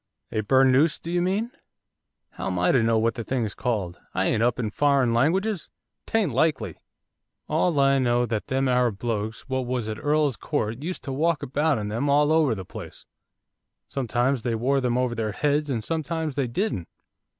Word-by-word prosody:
'A 110 - 0
burnoose 135 +6 +4
do 170 - -6
you 175 0 +1
mean?' 200 +7 0 0.8
'How - - -5
am 90 -1 -2
I 90 0 +3
to 130 - +4
know 115 0 +2
what 115 +1 +2
the 120 - -5
thing's 115 -2 -2
called? 105 -9 -2 0.2
I - - +1
ain't 110 - +1
up 120 +1 +2
in 110 -4 -2
foreign 140 -2 +2
languages, 180 - +1 0.4
'tain't 215 -9 +1
likely! 155 -3 0 0.7
All 170 -5 +1
I 135 0 +4
know 120 -1 +2
that 110 -3 -3
them 135 +1 0
Arab 125 -4 +2
blokes 110 -1 -3
what 130 -1 -2
was 125 -3 -2
at 110 0 -4
Earl's 145 -3 +2
Court 110 +4 -2
used 180 +4 -5
to 135 - -4
walk 155 +1 +1
about 145 +2 +1
in 105 -1 -3
them 115 +7 -1
all 145 +2 +4
over 155 -7 +3
the 95 -2 -7
place, - - -10 0.8
sometimes 125 0 0
they 115 0 -1
wore 135 +4 +1
them 125 -1 0
over 125 -1 0
their 110 -2 -2
heads, 145 +4 0
and 115 -5 -1
sometimes 160 0 -2
they 135 -3 0
didn't. 120 - -2
130 Hz, 190 wpm, -25 LUFS, 115-150 Hz, 0.8 s, burnoose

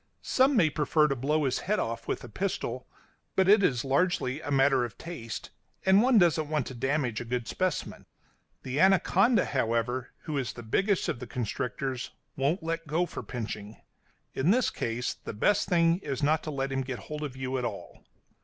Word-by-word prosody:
Some 265 +2 +3
may 160 -9 +4
prefer 150 +1 +2
to 135 - 0
blow 150 +5 0
his 130 -2 0
head 210 +3 0
off 115 - -3
with - - -2
a - - -7
pistol, - - -3 0.5
but 190 -1 +3
it 205 +1 +7
is 125 -10 +1
largely 140 -1 +1
a 145 - -6
matter 135 -2 +4
of 120 -3 -6
taste, 120 -10 -7 0.3
and 190 +2 +6
one 250 0 +4
doesn't 165 -5 +3
want 150 -4 0
to - - -7
damage 130 -2 -1
a - - -3
good 120 0 -3
specimen. 185 -3 -2 0.6
The 130 +2 -3
anaconda, 195 +5 +4
however, 120 0 -1
who 150 -3 -2
is 120 -7 -3
the 120 - -9
biggest 195 - +1
of - - -2
the 125 - -7
constrictors, 125 +3 -3 0.3
won't 145 +6 0
let 165 0 -3
go 165 +4 +1
for 170 - -7
pinching; 110 -3 -6 0.6
in 135 +6 +1
this 245 +5 +3
case 115 +2 -2
the - - -8
best 200 - +2
thing 170 -1 +3
is 140 -8 -4
not 155 +2 +3
to - - -3
let 135 -2 -2
him 135 0 0
get 130 -1 -4
hold 150 +9 -7
of 140 -4 -5
you 130 0 -2
at - - -4
all. - - -6
140 Hz, 195 wpm, -28 LUFS, 125-170 Hz, 0.6 s, it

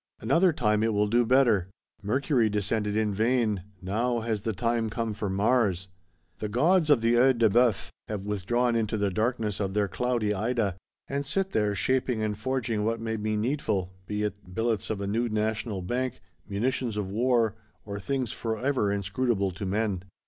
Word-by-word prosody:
Another 165 - +3
time 105 -8 +1
it 110 0 +1
will 105 0 +2
do 120 +2 +2
better. 115 -8 +4 0.3
Mercury 120 +2 +1
descended 105 +1 0
in 110 -2 +1
vain; 110 -2 +1 0.2
now 115 +5 0
has 110 -2 -2
the 110 - -1
time 115 +2 0
come 115 0 -2
for 105 -1 -3
Mars.—The 95 -4 -1
gods 155 - +3
of 140 -6 +5
the 115 +1 +3
Œil 125 +1 +5
de 115 -1 +5
Bœuf 120 -3 +2 0.2
have 105 -2 -4
withdrawn 115 +4 0
into 110 -1 0
the 100 -1 0
darkness 110 0 -1
of 95 -1 -2
their 105 -1 +2
cloudy 120 -1 0
Ida; 105 -2 0 0.3
and 140 +1 -2
sit 195 +7 -1
there, 105 - +1
shaping 125 +1 +1
and 105 -1 -1
forging 115 -1 -1
what 115 +1 0
may 110 0 -2
be 110 0 -1
needful, 105 -6 -1
be 105 0 -2
it 100 -3 -5
"billets 115 -2 0
of 105 -2 -2
a - - -2
new 115 +4 0
National 110 -2 -1
Bank," 125 +6 -2 0.3
munitions 120 +2 -1
of 100 -2 -3
war, 115 -1 +2 0.3
or 100 -1 -5
things 130 +2 -2
forever 115 -1 -1
inscrutable 100 0 0
to 95 +2 -5
men. 100 -2 0
110 Hz, 175 wpm, -27 LUFS, 100-120 Hz, 0.3 s, of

